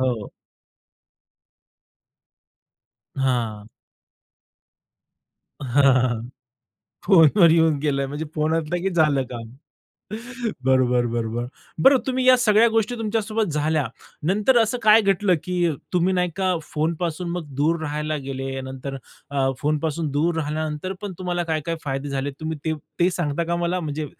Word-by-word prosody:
हो. 125 -5 -1 2.9
हां. 120 -6 -1 2.0
हां. 130 -2 +3 0.9
फोनवर 170 -1 +6
येऊन 160 -2 +4
गेलं 140 -2 0
म्हणजे 145 +3 -5
फोन 155 +1 +1
असलं 165 +1 -1
की 195 - 0
झालं 155 -6 +2
काम. 115 -2 -7 1.2
बरोबर 125 -2 +3
बरोबर. 115 0 -2 0.4
बरं 270 0 +7
तुम्ही 260 -1 0
या 255 0 +8
सगळ्या 230 -1 +5
गोष्टी 225 +1 0
तुमच्यासोबत 215 -3 -1
झाल्या. 150 -2 0 0.4
नंतर 210 - +3
असं 225 +2 +1
काय 215 +1 +7
घडलं, 195 -1 +2
की 175 -2 +1 0.2
तुम्ही 180 +1 +2
नाही 180 -1 +1
का 185 -2 +1
फोनपासून 165 +3 -2 0.2
दूर 160 +4 +1
राहायला 150 0 -2
गेले. 135 0 -4
नंतर 130 +1 -6 0.3
अ, 135 -1 +1
फोनपासून 155 +1 -1
दूर 160 +4 +1
राहिल्यानंतर 155 +3 -3
पण 205 -2 -4
तुम्हाला 175 -1 -2
काय 155 - 0
काय 165 0 -1
फायदे 135 0 -3
झाले? 140 0 -2
तुम्ही 160 0 -4
ते 160 - 0 0.3
ते 180 - +4
सांगता 170 -2 -1
का 170 +1 -1
मला, 175 +1 -1
म्हणजे 155 -1 -4
155 Hz, 125 wpm, -23 LUFS, 140-180 Hz, 2.9 s, या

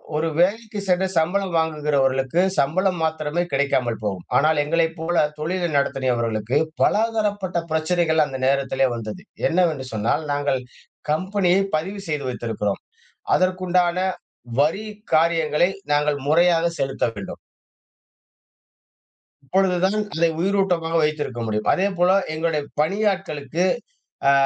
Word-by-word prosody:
ஒரு 155 +2 0
வேலைக்கு 210 +4 +1
சென்று 185 +1 +2
சம்பளம் 180 +3 +1
வாங்குகிறவர்களுக்கு 145 -3 +1 0.2
சம்பளம் 180 +6 +1
மாத்திரமே 160 +1 -1
கிடைக்காமல் 130 -4 0
போகும். 95 -4 -3
ஆனால் 155 +2 +4
எங்களை 165 +2 +2
போல 170 +1 -1 0.2
தொழில் 170 0 -2
நடத்துனியவர்களுக்கு 120 -4 0 0.2
பல - - +4 0.2
தரப்பட்ட 205 -4 -1
பிரச்சனைகள் 160 0 +2
அந்த 135 -2 -6
நேரத்திலே 135 0 +2
வந்தது. 115 +9 -6 0.3
என்னவென்று 165 -6 +1
சொன்னால் 115 +8 0
நாங்க 145 -1 0 0.5
கம்பெனியை 185 +2 +2
பதிவு 190 +6 -3
செய்து 150 -3 -2
வைத்திருக்கிறோம். 110 -4 -3 0.5
அதற்குண்டான 185 -1 +1 0.6
வரி 180 +9 +1 0.3
காரியங்களை 165 0 +3 0.2
நாங்க 150 0 +2 0.2
முறையாக 170 +2 +4
செலுத்த 135 -1 0
வேண்டும். 100 -2 -7 2.1
அப்பொழுது 190 +6 +2
தான் 205 +3 +1 0.2
அதை 165 +1 +3
உயிரூட்டமாக 180 -3 +1
வைத்திருக்க 150 -5 -2
முடியும். 105 0 -1
அதேபோல 185 -1 +2 0.2
எங்களுடைய 155 -1 -1 0.2
பணியாட்களுக்கு 180 -4 -1 0.7
ஆ - - +6
160 Hz, 110 wpm, -22 LUFS, 140-180 Hz, 2.1 s, ஆ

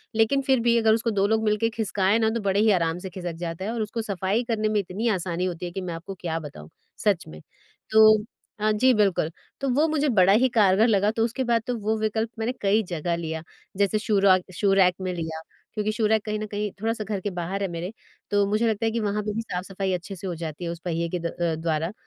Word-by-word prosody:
लेकिन 225 +5 +3
फिर 265 -2 +4
भी 235 0 +3
अगर 225 -1 +4
उसको 230 +1 0
2 200 -2 +2
लोग 220 +1 +1
मिलकर 215 +1 +2
खिसकाएँ 205 -2 +1
ना 220 - +3
तो 230 +1 -1
बड़े 200 0 +1
ही 215 0 +5
आराम 165 -3 +1
से 190 - -6
खिसक 180 -1 -5
जाता 165 +3 -4
है 220 - -2
और 230 - -2
उसको 220 +2 -3
सफ़ाई 200 +2 -1
करने 220 -2 -1
में 210 -1 +1
इतनी 200 +4 -3
आसानी 180 -3 -1
होती 180 -1 -4
है 175 - -5
कि 190 - -4
मैं 180 -2 -4
आपको 180 +4 -7
क्या 165 -2 -2
बताऊँ, 140 - -10 0.3
सच 200 -5 +1
में। 75 0 -11 0.5
तो 215 0 +7 0.4
अ, 215 +1 +2
जी 255 +5 +4
बिल्कुल। 195 -7 +2 0.3
तो 275 - 0
वो 295 +6 +3
मुझे 300 -2 +1
बड़ा 195 -4 +5
ही 255 +4 +4
कारगर 215 -2 +4
लगा 205 -2 +3
तो 225 0 0
उसके 245 +3 -2
बाद 235 -2 +2
तो 250 - -1
वो 220 +1 -1
विकल्प 220 +1 -1
मैंने 225 +2 0
कई 205 +2 +3
जगह 170 0 -1
लिया। 160 -1 -4 0.4
जैसे 200 +1 +2
शू 215 -1 0
रक 185 -1 +4
शू 200 +2 +2
रैक 185 -2 +4
में 185 -1 -2
लिया 160 -2 -4 0.3
क्योंकि 215 0 -1
शू 220 0 -1
रैक 220 -1 +2
कहीं 215 -1 -2
न 215 - -3
कहीं 205 0 -3
थोड़ा-सा 225 0 -1
घर 205 -1 -3
के 205 - -2
बाहर 180 +2 -4
है 195 - 0
मेरे 170 +2 -5 0.4
तो 205 0 +3
मुझे 215 +3 +2
लगता 220 0 0
है 225 - +1
कि 230 - -1
वहाँ 210 -1 -1
पे 210 0 -3
भी 225 - -2
साफ-सफ़ाई 190 -2 -3
अच्छे 185 +3 -4
से 190 +1 -7
हो 175 - -3
जाती 160 0 -6
है 170 - -2
उस 170 - -7
पहिए 170 -1 -1
के 180 - -2
द 170 - -8
अ, 170 -1 -1
द्वारा। 160 +1 -1
205 Hz, 255 wpm, -25 LUFS, 180-220 Hz, 0.5 s, तो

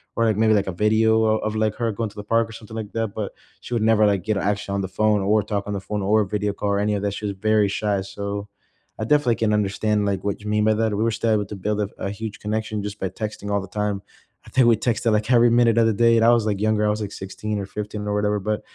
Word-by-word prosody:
or 115 - +2
like 110 -2 +1
maybe, 110 0 +4
like, 100 -2 +1
a - - -1
video 110 +4 +3
o 110 0 +3
of, 110 0 -3
like, 110 -1 +1
her 115 -2 -1
going 110 +1 -3
to - - -21
the 105 - -7
park 115 +2 +1
or - - -12
something 110 0 -10
like 110 -2 -5
that, 115 -1 -1
but 105 -2 -3 0.3
she 125 - -7
would 115 - +1
never, 110 -1 +4
like, 100 -3 +1
get 110 -1 0
actually 100 0 -1
on 100 - 0
the 95 - -3
phone, 105 +2 +1
or 105 +2 +3
talk 100 -1 -3
on 105 - -4
the 100 - -3
phone, 105 0 -3
or 105 +2 +3
video 105 +1 -2
call 100 0 -3
or 100 0 +1
any 105 +1 +1
of 100 - -1
that, 100 -1 -1
she 105 - -5
was 100 - -2
very 110 -1 +3
shy. 100 0 -1
So, 100 +1 -5 0.5
I 110 - -2
definitely 125 -5 +2
can 110 -2 +1
understand, 105 +1 0
like, 100 -2 -1
what 100 0 -2
you 105 - -9
mean 105 0 +1
by 110 0 +3
that, 110 -1 0
we 110 - 0
were 115 - +2
still 110 +1 0
able 105 -2 +2
to 105 - -7
build 105 +2 -2
a - - +2
f - - -9
a 100 - -3
huge 110 0 -6
connection 110 0 -3
just 105 0 -6
by 95 - -2
texting 105 -2 -6
all 100 -1 +1
the 95 - -8
time. 105 0 -2 0.4
I - - -13
think 130 -3 +3
we 115 - +6
texted 115 -1 0
like 105 +4 0
every 120 0 +6
minute 115 -1 +3
of 115 - +4
the 110 - +2
day, 115 +2 +4
and 115 - +4
I - - +7
was 115 -2 +2
like 100 -2 -1
younger, 110 -1 +2
I - - +2
was 105 +1 -1
like 100 -1 -4
16 105 +2 -5
or 100 - -4
15, 105 +1 -6
or 105 - -1
whatever, 105 0 +1
but, 105 +2 -2
105 Hz, 305 wpm, -23 LUFS, 100-110 Hz, 0.5 s, I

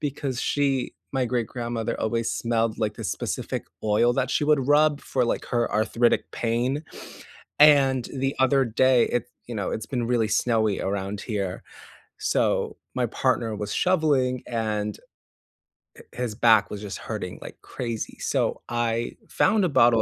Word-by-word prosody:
because 140 -3 -3
she 140 -3 0 0.2
my 130 -2 +1
great 120 -2 -1
grandmother 120 -2 -3
always 115 +1 0
smelled, 115 -1 0
like, 110 -2 -1
this - - -4
specific - - -3 0.2
oil 110 +3 +3
that 135 0 0
she - - +1
would 150 -4 +2
rub 150 0 +4
for, 125 -2 0
like, - - -1
her 120 -1 0
arthritic 115 +2 +1
pain, 125 +6 -1 0.7
and 135 -4 +5
the 135 0 -1
other 135 +1 +4
day, 125 +1 +4
it 120 -1 -1 0.2
you 120 - -6
know, 100 -4 -2
it's 110 - -4
been 120 -4 -2
really 115 -3 +1
snowy 110 -2 +1
around 100 +1 -3
here. 100 -5 -3 0.6
So - - 0 0.2
my - - +1
partner 110 -2 0
was 105 0 -4
shoveling, 145 -8 +2
and 105 -3 -2 1.0
hi - - -12
his 120 -4 -3
back 115 -3 +4
was 105 0 -5
just 100 -2 -6
hurting - - -5
like - - -9
crazy. 115 -3 -5
So - - -1
I 120 0 -1 0.2
found 215 -3 +3
a 175 - +1
bottle 115 -4 +5
120 Hz, 155 wpm, -25 LUFS, 110-130 Hz, 1.0 s, and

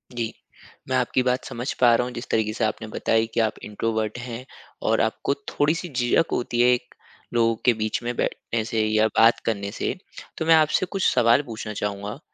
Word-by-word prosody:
जी। 115 -2 -2 0.6
मैं 130 - +1
आपकी 125 +1 +1
बात 125 0 0
समझ 125 +3 -4
पा 120 -1 +7
रहा 125 - +1
हूँ, 125 - -6
जिस 120 - -6
तरीके 110 -1 +1
से 110 - -2
आपने 110 +1 -3
बताई 110 +1 +1
कि - - 0
आप 110 -1 0
इंट्रोवर्ट 110 +1 -2
हैं 120 +1 -7 0.4
और - - +3
आपको 140 - 0 0.2
थोड़ी-सी 165 +4 0
झिझक 125 +5 +1
होती 120 0 0
है 125 - +5
एक, 125 0 -4 0.4
लोगों 115 -1 +3
के 125 - +6
बीच 110 +1 -2
में 120 0 -2
बैठने 115 -1 -2
से 110 -1 0
या 110 0 +3
बात 115 +1 +6
करने 100 -3 -2
से, - - -2 0.4
तो 160 - -2
मैं 165 0 +7
आपसे 155 +4 +3
कुछ 195 0 -2
सवाल 120 +2 +4
पूछना 110 -2 -6
चाहूँगा। 105 +4 -4
115 Hz, 200 wpm, -24 LUFS, 110-125 Hz, 0.6 s, पा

